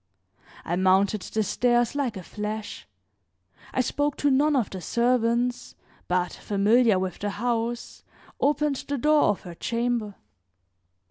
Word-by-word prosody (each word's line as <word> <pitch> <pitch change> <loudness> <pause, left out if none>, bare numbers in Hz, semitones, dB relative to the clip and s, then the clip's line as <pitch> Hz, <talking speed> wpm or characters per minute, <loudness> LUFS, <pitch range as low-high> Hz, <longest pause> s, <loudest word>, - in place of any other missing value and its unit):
I 175 - -1
mounted 190 +2 +3
the 220 +3 -2
stairs 240 +3 +1
like 265 -7 -2
a 185 - -7
flash; 210 +2 -6 0.8
I 260 - +1
spoke 290 +3 -1
to 290 - +2
none 290 +3 +3
of 245 -6 0
the 190 - -6
servants, 240 +3 0 0.3
but, 180 0 0
familiar 210 +2 +3
with 185 -1 -3
the 205 - -2
house, 235 +2 -3 0.4
opened 290 0 +1
the 285 - -1
door 300 +3 +4
of 205 - +1
her 175 - -9
chamber. 230 +1 -2
235 Hz, 135 wpm, -25 LUFS, 200-250 Hz, 0.8 s, door